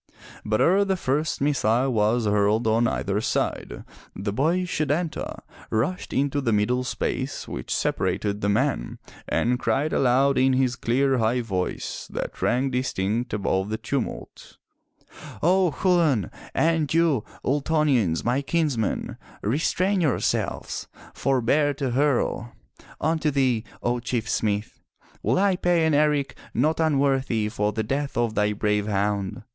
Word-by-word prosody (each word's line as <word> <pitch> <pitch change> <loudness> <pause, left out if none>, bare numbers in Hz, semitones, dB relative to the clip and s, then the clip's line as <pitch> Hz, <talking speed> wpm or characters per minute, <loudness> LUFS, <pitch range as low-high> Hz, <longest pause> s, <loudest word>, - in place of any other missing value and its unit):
But 110 0 0
ere 195 +4 +4
the 190 -1 0
first 150 0 -1
missile 130 -2 +2
was 110 +2 +2
hurled 105 +2 +2
on 115 +2 +3
either 100 -2 -1
side, - - -2 0.3
the 100 +1 -3
boy, 165 - +1
Setanta, 155 0 -2 0.3
rushed 125 +12 -1
into 140 +1 0
the 120 -4 0
middle 110 +4 +1
space - - -3
which 60 - -6
separated 105 0 -1
the 100 - +1
men 105 +2 0 0.3
and 125 +1 +1
cried 140 +7 0
aloud 135 +2 +3
in 130 0 +4
his 130 -1 +1
clear, 130 +2 +1
high 115 +3 +1
voice 95 -6 -3
that - - -5
rang 130 +2 +1
distinct 120 -2 -1
above 100 -1 -1
the 110 - -2
tumult: 115 - -5 0.9
"O 185 +2 +4
Chulain, 160 - +2 0.2
and 160 -3 +2
you, 160 -8 +2 0.2
Ultonians, 140 - +1
my 125 +4 +1
kinsmen, 140 -6 -1 0.3
restrain 180 - +1
your 150 -8 +1
selves! - - -2 0.3
Forbear 135 +3 +1
to 135 -2 -2
hurl! 125 -3 0 0.5
Unto 160 -1 +1
thee, 130 -5 +1 0.2
O 120 +1 0
Chief 120 -1 -2
smith, 105 -3 -2 0.4
will 115 +6 +1
I 195 -1 +3
pay 175 -2 +2
an 160 - +2
eric 145 -1 +2 0.2
not 155 +8 +1
unworthy 135 -7 +1
for 105 -1 -1
the 110 +1 -2
death 140 +5 -2
of 120 -2 +1
thy 105 0 +1
brave 105 0 0
hound. 100 -1 -1
125 Hz, 140 wpm, -24 LUFS, 110-150 Hz, 0.9 s, ere